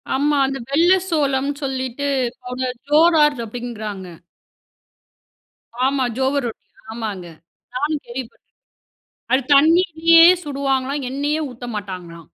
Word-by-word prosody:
ஆமா. 290 +1 +1
அந்த 270 0 -3
வெள்ளை 340 +7 +4
சோளம்ன்னு 280 -3 0
சொல்லிட்டு, 265 0 -3 0.4
அவங்க 255 +1 -3 0.2
ஜோரார் 300 -2 +4
அப்படிங்கிறாங்க. 215 -4 -6 1.8
ஆமாம். 265 -2 0
ஜோவர் 265 0 0
ரொட்டி 225 - -10 0.3
ஆமாங்க 210 -6 -5 0.5
நானும் 295 +3 -1
கேள்விப்பட்டேன், 240 0 -8 0.9
அது 260 +1 +3
தண்ணியிலயே 330 +2 +5 0.2
சுடுவாங்களாம் 275 -1 -2
எண்ணெயே 295 +3 -1
ஊத்த 245 0 -9
மாட்டாங்களாம். 180 -5 -8
270 Hz, 95 wpm, -20 LUFS, 245-295 Hz, 1.8 s, தண்ணியிலயே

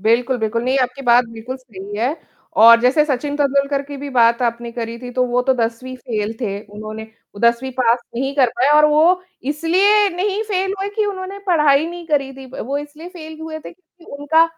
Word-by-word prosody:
बिल्कुल, 235 +5 +2
बिल्कुल। 225 +1 -1
नहीं, 260 +2 +1
आपकी 255 +1 -2
बात 245 -1 +5
बिल्कुल 230 +3 -7
सही 205 -6 -10
है 250 +8 -1 0.5
और 230 +1 +9
जैसे 260 +5 +3
सचिन 285 0 -2
तेंदुलकर 280 0 +1
की 285 0 -9
भी 285 +1 -6
बात 235 -1 +3
आपने 235 0 -2
करी 230 -1 -5
थी, 245 0 -8
तो 255 +1 0
वो 245 0 0
तो 265 +1 +2
10वीं 240 +2 -3
फ़ेल 220 -4 -3
थे। 200 -4 -2
उन्होंने 215 +1 -8 0.3
वो 200 - -10
10वीं 235 +3 +2
पास 240 -1 +3 0.2
नहीं 270 +3 -2
कर 260 -3 +4
पाए 260 +4 +3
और 300 - +6
वो 325 +5 +3 0.3
इसलिए 380 +7 +3
नहीं 400 +3 -1
फ़ेल 385 -1 0
हुए 390 +1 -2
कि 430 - +2
उन्होंने 390 0 -5
पढ़ाई 300 -4 +3
नहीं 345 0 -8
करी 280 -4 0
थी। 265 0 -11
व - - -5
वो 280 +2 -1
इसलिए 295 +3 -9
फ़ेल 320 -3 -10
हुए 320 0 -6
थे - - -11
क्योंकि 355 -1 -20
उनका 320 +3 +4
270 Hz, 210 wpm, -19 LUFS, 235-315 Hz, 0.5 s, और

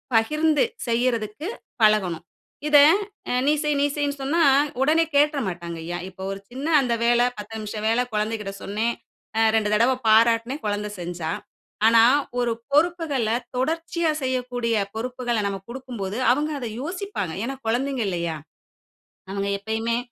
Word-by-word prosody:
பகிர்ந்து 305 +7 +3 0.2
செய்யறதுக்கு 235 - -1 0.3
பழகணும். 190 -6 +3 0.4
இத 300 -1 +6 0.5
அ, - - 0 0.2
"நீ 295 - +5
செய்" 300 -1 +1
நீ - - +4
செய்ன்னு 285 -1 0
சொன்னா, 325 +5 +2 0.4
உடனே 315 +4 +4
கேட்றமாட்டாங்கய்யா. 175 - 0
இப்போ 190 0 -10
ஒரு 195 - -5
சின்ன 270 +5 -5
அந்த 245 -3 0
வேல, 240 0 +4 0.2
10 210 +1 -8
நிமிஷ 215 0 -6
வேல 230 +2 +3
குழந்தக்கிட்ட 210 -1 -2
சொன்னேன். 220 +4 -1 0.4
அ - - +3
2 215 -2 +2
தடவ 235 +5 +4
பாராட்னேன், 230 +5 +4
குழந்த 210 0 -1
செஞ்சா. 170 -2 -4 0.6
ஆனா 230 0 +6 0.4
ஒரு 240 -1 +1 0.2
பொறுப்புகள 300 -6 +1 0.3
தொடர்ச்சியா 330 +4 0
செய்யக்கூடிய 250 -2 -1 0.2
பொறுப்புகள 245 0 -2
நம்ம 195 -1 -3
குடுக்கும்போது, 235 -6 -5
அவுங்க 295 +4 +1
அத 240 -3 -4
யோசிப்பாங்க. 350 - -4
ஏன்னா, 270 +3 -3
குழந்தைங்க 255 +2 0
இல்லையா? 170 -3 -2 0.9
அவுங்க 200 0 -2
எப்பயுமே 225 +3 -1
235 Hz, 130 wpm, -24 LUFS, 210-280 Hz, 0.9 s, இத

